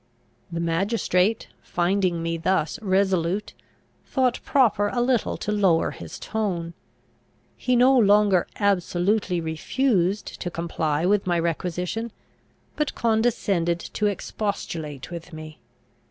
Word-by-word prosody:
The 170 - -3
magistrate, 185 +4 +1
finding 175 -1 0
me 165 0 -1
thus 165 0 0
resolute, 190 -1 +1 0.5
thought 255 -3 0
proper 215 -7 +3
a 240 - -2
little 245 -2 +1
to 210 - -3
lower 190 -6 +2
his - - -9
tone. 180 -6 -3 0.8
He 250 - 0
no 255 +2 +5
longer 205 -5 +4
absolutely 195 -1 +1
refused 185 - 0 0.2
to 175 - -2
comply 165 -2 -1
with 195 0 +2
my 175 -1 +2
requisition, 180 +6 -2 0.6
but 300 -2 -1
condescended 210 -7 +1
to 210 +4 -2
expostulate 170 -8 -4
with 170 0 -8
me. 155 -1 -9
190 Hz, 110 wpm, -24 LUFS, 170-215 Hz, 0.8 s, no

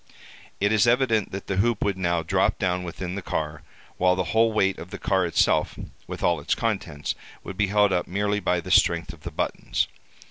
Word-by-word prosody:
It 100 +1 +2
is 110 +1 +4
evident 120 -4 +2
that 95 0 -6
the 95 - -2
hoop 115 +1 +2
would 100 -2 +1
now 85 -3 0
drop 80 - +1
down 90 0 0
within 90 +1 -5
the 100 - -4
car, 75 -3 -3 0.4
while 90 0 +3
the 95 - 0
whole 115 0 +4
weight 95 -3 +1
of 85 - -8
the - - -6
car 95 -2 +1
itself, 85 - +2 0.3
with - - -6
all 85 -3 +2
its 70 - 0
contents, 90 - -2 0.3
would 95 - -7
be 105 +1 +1
held 105 0 +3
up 90 - 0
merely 105 +2 0
by 90 -2 0
the 90 - -7
strength 85 -3 +3
of 80 - -15
the - - -5
buttons. - - -1
95 Hz, 210 wpm, -25 LUFS, 85-105 Hz, 0.4 s, is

